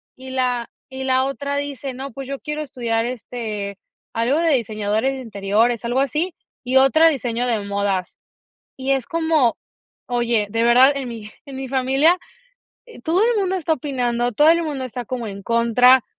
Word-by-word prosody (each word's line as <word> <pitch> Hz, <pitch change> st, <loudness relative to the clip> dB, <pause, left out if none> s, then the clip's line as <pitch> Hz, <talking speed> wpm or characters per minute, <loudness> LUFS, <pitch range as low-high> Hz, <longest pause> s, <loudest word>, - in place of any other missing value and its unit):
Y 260 Hz, 0 st, -10 dB
la 250 Hz, -2 st, -1 dB, 0.2 s
y 265 Hz, 0 st, -6 dB
la 260 Hz, 0 st, +2 dB
otra 280 Hz, +1 st, -3 dB
dice: 280 Hz, -2 st, -4 dB
"No, 270 Hz, +1 st, -6 dB
pues 270 Hz, +2 st, -8 dB
yo 275 Hz, 0 st, -4 dB
quiero 300 Hz, 0 st, -4 dB
estudiar, 235 Hz, -5 st, -1 dB
este, 215 Hz, -5 st, -5 dB, 0.3 s
algo 235 Hz, +6 st, +1 dB
de 330 Hz, -2 st, +2 dB
diseñadores 220 Hz, +1 st, 0 dB
de 265 Hz, -, -6 dB
interiores", 220 Hz, +2 st, 0 dB
algo 250 Hz, +3 st, +1 dB
así, 305 Hz, +7 st, -1 dB, 0.3 s
y 255 Hz, +1 st, +2 dB
otra 315 Hz, +5 st, +6 dB
diseño 245 Hz, -4 st, -2 dB
de 225 Hz, -3 st, 0 dB
modas. 200 Hz, -2 st, -2 dB, 0.6 s
Y 265 Hz, +1 st, 0 dB
es 265 Hz, -3 st, -1 dB
como, 320 Hz, -7 st, +1 dB, 0.5 s
oye, 235 Hz, -3 st, +1 dB
de 230 Hz, +2 st, 0 dB
verdad 250 Hz, +4 st, +6 dB
en 270 Hz, -2 st, -4 dB
mi 220 Hz, -3 st, -8 dB, 0.2 s
en 275 Hz, -1 st, -9 dB
mi 265 Hz, 0 st, -5 dB
familia 270 Hz, +6 st, +3 dB, 0.7 s
eh -, -, -13 dB
todo 345 Hz, +5 st, +2 dB
el 470 Hz, 0 st, +3 dB
mundo 380 Hz, -1 st, 0 dB
está 320 Hz, -2 st, 0 dB
opinando, 245 Hz, -3 st, -1 dB
todo 295 Hz, +8 st, +4 dB
el 335 Hz, 0 st, +3 dB
mundo 290 Hz, -4 st, -3 dB
está 245 Hz, 0 st, -5 dB
como 240 Hz, -1 st, -4 dB
en 200 Hz, -1 st, -7 dB
contra 235 Hz, +2 st, +4 dB
255 Hz, 180 wpm, -21 LUFS, 230-275 Hz, 0.7 s, otra